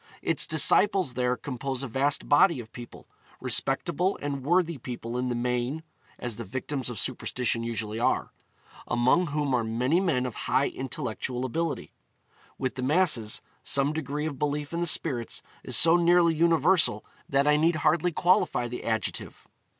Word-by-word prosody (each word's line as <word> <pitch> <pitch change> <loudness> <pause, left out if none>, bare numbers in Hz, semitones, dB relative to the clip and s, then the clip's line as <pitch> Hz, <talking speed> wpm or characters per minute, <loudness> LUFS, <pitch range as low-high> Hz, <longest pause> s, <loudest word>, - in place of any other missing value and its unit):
Its 150 -2 +3
disciples 185 - +4
there 125 0 0
compose 130 +2 -4
a - - -3
vast 135 +4 0
body 145 +1 +4
of 110 -2 -10
people, 120 0 -11 0.3
respectable 170 +7 0
and 140 -2 -4
worthy 170 0 +1
people 120 -1 -6
in 125 0 -1
the 120 - -2
main 125 +5 -2 0.3
(as 120 -3 -4
the 115 - -5
victims 130 +5 -4
of 120 - -6
superstition 125 -1 -2
usually 115 -1 -4
are), 120 - 0 0.6
among 130 +9 +2
whom 145 -2 -1
are 120 -2 +1
many 125 +9 0
men 155 -10 0
of 125 - -4 0.2
high 140 - +2
intellectual 130 -1 -4
ability. 165 +5 -3 0.7
With 130 -1 -2
the 130 - -6
masses, 135 -6 +1 0.2
some 140 +1 +1
degree 150 -1 -3
of 145 -4 -5
belief 150 +1 -2
in 170 - -2
the 175 - +1
spirits 130 -8 0 0.2
is - - +2
so 170 +1 +7
nearly 170 -1 +4
universal 165 - +2 0.2
that 140 +1 +2
I 150 0 +4
need 160 +3 +2
hardly 155 +3 +1
qualify 170 -8 +1
the 125 +1 -7
adjective. 110 -1 -3
140 Hz, 160 wpm, -27 LUFS, 125-160 Hz, 0.7 s, so